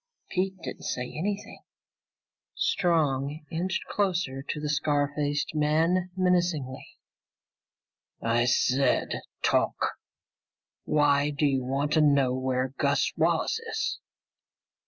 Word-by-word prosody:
Pete 190 +1 -1
didn't - - -6
say 125 - -2
anything. 200 +5 -4 0.9
Strong 150 -4 +1
inched 180 +4 -1
closer 175 -9 -1
to 150 - -4
the 150 - -3
scar 145 -1 +1
faced 145 0 -1
man 160 +4 +2
menacingly. 175 -8 0 1.2
"I 115 +1 +1
said 125 +1 +2 0.2
talk! - - +1 0.9
Why 145 -1 +3
do 150 +1 0
you 135 -2 +1
want 140 +3 -1
to 155 - +4
know 140 -4 +4
where 130 0 -1
Gus - - +2
Wallace - - +1
is? - - -3
150 Hz, 105 wpm, -27 LUFS, 135-170 Hz, 1.2 s, to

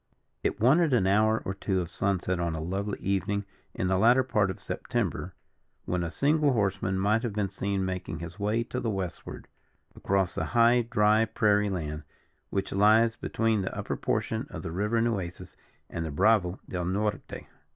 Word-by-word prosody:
It - - -1
wanted 145 +6 +4
an 115 -6 +3
hour 110 +3 +3
or 95 - -2
two 95 -1 -1
of 85 -1 -4
sunset 95 -2 -1
on 85 -2 -1
a - - -4
lovely 95 +5 -3
evening 100 +1 -1 0.3
in 90 - -1
the 95 0 +2
latter 120 +5 +5
part 105 -6 +1
of 95 - -5
September, - - -3 0.5
when 90 -1 -1
a 85 - -2
single 145 - +2
horseman 95 -3 0
might 105 +4 +2
have 120 -4 -3
been 100 -2 -1
seen 100 0 -2
making 90 -4 -4
his 85 +4 -8
way 105 +3 0
to 125 +2 -4
the 115 - -2
westward, 95 -4 -5 0.5
across 95 -2 0
the - - -2
high 120 +1 +6
dry 110 -1 +3
prairie 105 -1 +2
land, 75 -5 -3 0.5
which 95 - -2
lies 110 +3 +4
between 110 -2 0
the 95 - -4
upper - - -3
portion - - -2
of - - -7
the 80 - -4
river 105 +6 0
Nueces 100 -7 -3 0.3
and 85 - -4
the 80 - -4
Bravo 90 +3 +2
del 90 -1 -3
Norte. 105 +3 -2
100 Hz, 180 wpm, -28 LUFS, 95-110 Hz, 0.5 s, high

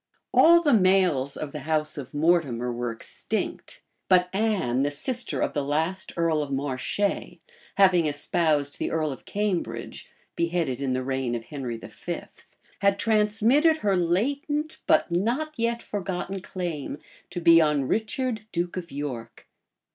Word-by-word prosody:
All 340 +1 +7
the 290 - +4
males 185 - +3
of 150 -2 -5
the 150 - -5
house 155 +1 -1
of 140 -4 -7
Mortimer 145 -7 +1
were 120 0 -2
extinct; 115 - -4 0.3
but 180 -1 +4
Anne, 195 - +1
the 145 - +2
sister 245 - -1
of - - 0
the 145 - -1
last 160 +7 -1
earl 165 -2 +2
of 145 -1 -4
Marche, 135 +4 -3 0.8
having 185 -5 +5
espoused 145 0 0
the - - -1
earl 155 -2 0
of 135 - -9
Cambridge, 180 - -3 0.3
beheaded 170 -6 -1
in 135 -2 0
the 130 0 -1
reign 130 -2 -1
of 115 - -4
Henry 125 -4 -5
V. - - -6 0.6
had 200 0 +3
transmitted 225 +9 +3
her 200 -2 +3
latent, 280 - 0
but - - +3
not 240 - 0
yet 235 0 -1
forgotten 195 -1 -4
claim 175 -7 -5 0.3
to 180 - -4
be; 165 -1 +7
on 150 -3 +2
Richard, 220 - -1
duke 175 +1 -2
of 175 -2 -6
York. 135 -5 -6
170 Hz, 145 wpm, -26 LUFS, 140-205 Hz, 0.8 s, All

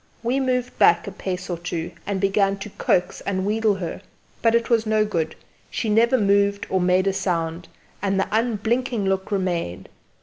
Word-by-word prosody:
We 245 +4 +1
moved 250 -2 -1
back 170 - +5
a 200 - -5
pace 185 -1 -4
or 175 -2 -3
two 170 0 -4 0.2
and 200 -1 -1
began 195 0 +2
to 195 +1 -8
coax 180 -1 0
and 190 -1 -2
wheedle 215 0 +2
her; 180 -1 -5 0.4
but 230 0 +4
it 235 0 +2
was 230 -2 +2
no 215 0 +3
good; 165 -6 -2 0.3
she 225 - -2
never 235 +4 +4
moved 200 -1 +2
or 190 -1 +2
made 180 +1 +3
a 195 - +2
sound, 170 -3 -2 0.3
and 195 -1 +1
the 195 - +1
unblinking 230 +1 0
look 190 +1 -1
remained. 175 - -2
200 Hz, 180 wpm, -23 LUFS, 185-220 Hz, 0.4 s, back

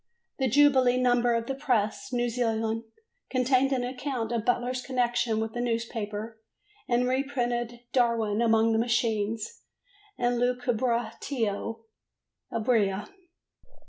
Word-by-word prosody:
The 265 - +2
jubilee 260 -1 +5
number 245 -1 +3
of 230 0 -1
the 270 - -2
Press, 250 -4 -1
New 240 -1 +1
Zealand, 225 -1 -1 0.4
contained 255 +1 +2
an 255 -2 +1
account 250 -2 -3
of 230 -2 -1
Butler's 250 +1 0
connection 240 -3 0
with 220 0 -3
the 240 - -2
newspaper 225 -2 -3 0.5
and 245 +1 +2
reprinted 245 -3 -1
"Darwin 230 -4 +2
among 225 -1 +4
the 220 - +2
Machines" 225 -2 -1 0.6
and 245 -1 +1
"Lucubratio 240 -2 -1 0.7
Ebria." 215 -4 +1
240 Hz, 110 wpm, -28 LUFS, 225-250 Hz, 0.7 s, jubilee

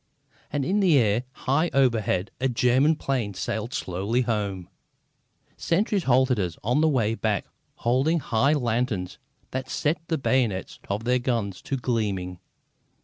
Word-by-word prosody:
And 145 -2 -1
in 200 +8 +1
the 180 -7 +5
air, 115 0 +2 0.2
high 155 +6 +2
overhead, 115 -8 +2
a 135 - +2
German 130 +5 +3
plane 125 -9 -2
sailed 110 +4 -3
slowly 100 +7 -1
home. 105 -6 -2 0.9
Sentries 195 +1 0
halted 130 -2 +3
us 90 -4 -2
on 125 +8 +2
the 160 - +4
way 115 -6 +1
back 110 -3 -1 0.3
holding 135 +8 +1
high 135 +2 +2
lanterns 120 -8 -1 0.3
that 130 0 -4
set 150 +1 0
the 160 - 0
bayonets 120 -9 0
of 100 +3 -2
their 125 +1 +2
guns 115 -7 -2
to 135 - -3
gleaming. 100 -8 -2
125 Hz, 145 wpm, -25 LUFS, 105-135 Hz, 0.9 s, the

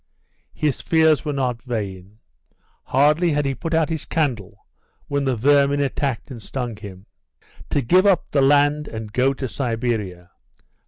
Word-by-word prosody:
His 150 -3 -1
fears 160 -3 +3
were 150 - -2
not 125 -4 -2
vain. 100 -5 -5 0.7
Hardly 150 +5 +3
had 145 0 0
he 135 - 0
put 165 +4 -3
out 160 -1 +2
his 160 -2 -3
candle 125 - -3 0.4
when 140 -1 -1
the 130 -2 +1
vermin 140 +4 +3
attacked 140 -2 -2
and 120 -3 -8
stung 120 +1 -5
him. 100 -2 -11 0.6
"To 145 - 0
give 185 - +4
up 195 -3 +3
the 140 - +2
land 145 +2 +3
and 110 -2 -7
go 130 +2 +3
to 130 - -4
Siberia. 115 -9 -3
135 Hz, 155 wpm, -22 LUFS, 115-145 Hz, 0.7 s, give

